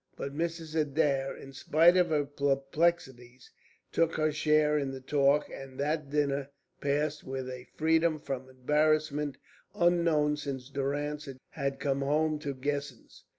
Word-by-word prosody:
But 140 - -5
Mrs. 165 0 -3
Adair, 145 -3 +1
in 135 - -11
spite 165 +6 +4
of 180 -2 +3
her 150 -2 +1
perplexities, 135 -2 -1 0.4
took 165 0 +1
her 155 0 +1
share 150 0 +3
in 140 -2 0
the 135 0 -6
talk, 140 +2 +2
and 135 -1 -9
that 150 0 -1
dinner 140 -1 0 0.3
passed 150 +2 0
with 130 -1 -5
a 125 0 -8
freedom 160 0 +2
from 130 -2 -5
embarrassment 150 +1 +1 0.4
unknown 170 -4 +3
since 135 -3 -5
Durrance 145 +2 -2 0.2
had 140 -2 -3
come 140 -1 0
home 150 +2 +1
to 145 -2 -4
Guessens. 140 -2 -5
145 Hz, 140 wpm, -30 LUFS, 135-155 Hz, 0.4 s, spite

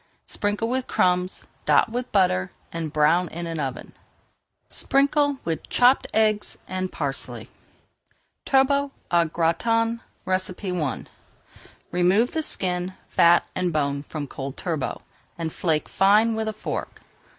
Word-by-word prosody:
Sprinkle 205 +2 -1
with 255 +2 -1
crumbs, 180 0 +1 0.2
dot - - +4
with 250 +1 -4
butter, 140 - +2 0.2
and 165 -2 -4
brown 160 +4 +3
in 170 +1 -6
the 165 -3 -3
oven. 130 -2 -6 0.7
Sprinkle 285 +1 +2
with 165 -1 -3
chopped 250 +2 +4
eggs 215 -1 +1
and 185 0 -3
parsley. 140 -3 -2 0.9
TURBOT 280 +1 +3 0.2
AU 170 -1 +4
GRATIN 225 +9 0 0.2
I 185 -4 -2 0.9
Remove 185 +7 +3
the 320 - -1
skin, 180 - -2
fat, 170 0 +5
and 180 -1 -1
bone 140 -2 0
from 150 0 -6
cold 135 0 -7
turbot, 160 -6 -3 0.4
and 165 -2 -3
flake 160 -3 0
fine 210 +4 +4
with 220 0 -2
a 220 - -2
fork. 215 - -5
185 Hz, 125 wpm, -24 LUFS, 165-225 Hz, 0.9 s, fat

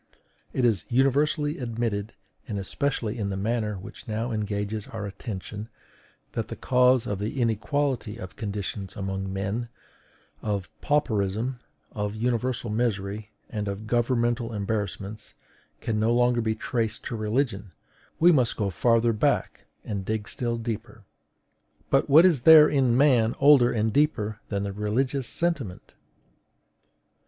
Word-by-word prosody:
It 130 - +1
is 105 -8 +2
universally 145 +4 +2
admitted, 115 -3 -3 0.3
and 105 - -3
especially 115 +2 -2
in 100 -2 -1
the 95 - -3
matter 105 +1 -1
which 95 - -11
now 110 +2 -2
engages 105 -1 -3
our 100 - -5
attention, 105 +1 -6 0.6
that - - -3
the - - -6
cause 125 -1 +3
of 100 -2 -3
the 110 +6 -3
inequality 120 0 0
of 95 -5 -9
conditions 100 -2 -5
among 95 0 -3
men 100 +5 -3 0.7
of 100 -4 -3
pauperism, 120 -3 0 0.3
of 105 0 -3
universal 120 0 -1
misery, 105 -2 -2 0.2
and 105 -2 -4
of 100 +2 -4
governmental 120 0 0
embarrassments 105 0 -4 0.5
can 110 -2 -1
no 110 +2 +2
longer 120 0 +3
be 110 -1 0
traced 110 -1 -2
to 120 - -4
religion: 110 -3 -1 0.5
we 175 +2 +7
must 130 -7 +2
go 100 -3 0
farther 115 +4 +3
back, 105 - 0 0.2
and 100 -3 -3
dig 110 +1 -3
still 120 -1 -2
deeper. 115 -2 -5 0.9
But 135 +2 +3
what 155 +5 +8
is 165 -9 +4
there 155 +1 +9
in 130 -5 +2
man 125 -5 +4
older 140 -4 +6
and 110 -1 0
deeper 110 -8 +1
than 100 -1 -1
the 100 -1 -3
religious 125 +6 0
sentiment? 150 - -2
110 Hz, 135 wpm, -26 LUFS, 105-125 Hz, 0.9 s, there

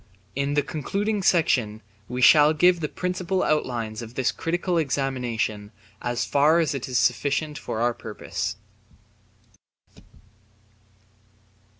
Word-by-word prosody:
In 140 +1 -1
the 145 - +2
concluding 200 +7 -2
section 120 - +1 0.3
we 125 +1 -2
shall 150 +3 +7
give 175 +2 +4
the 150 -2 -3
principal 185 0 -2
outlines 120 -7 -1
of 115 +1 -10
this 130 - +1
critical 175 +1 -1
examination 125 -7 -2 0.3
as 120 0 -1
far 150 +3 +3
as 160 -4 +1
is 130 -2 -2
sufficient 145 +5 0
for 110 - -4
our 120 0 +2
purpose. - - -5
140 Hz, 110 wpm, -24 LUFS, 120-165 Hz, 0.3 s, shall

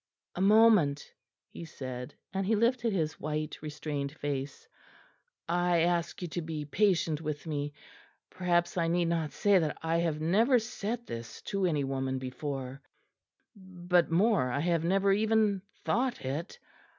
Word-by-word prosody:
"A 180 - -4
moment," 200 -8 +4 0.4
he - - -8
said, 130 -5 -7 0.2
and 195 0 0
he 215 +4 +2
lifted 235 +1 +2
his 160 -5 -1
white 155 0 -3
restrained 150 -2 -4
face. 140 -2 -5 0.8
"I 175 0 +2
ask 170 +1 0
you - - -2
to 175 - -3
be 155 -2 -5
patient 165 -2 +1
with 150 -2 -4
me. 145 -2 -3 0.6
Perhaps 175 -1 0
I 165 - +1
need 170 0 +1
not 165 -3 -1
say 200 -2 +3
that 155 -3 -1
I 165 +1 +1
have 165 -3 0
never 215 - +4
said 230 0 -4
this 115 0 -7
to 195 -2 0
any 150 -4 0
woman 135 -1 -2
before; 130 +1 -5 0.7
but 180 -3 0
more, 180 - +3
I 140 +3 -1
have 170 -1 +1
never 195 +3 +2
even 215 -1 +2 0.2
thought 245 - 0
it. 150 +8 -4
170 Hz, 150 wpm, -30 LUFS, 150-195 Hz, 0.8 s, moment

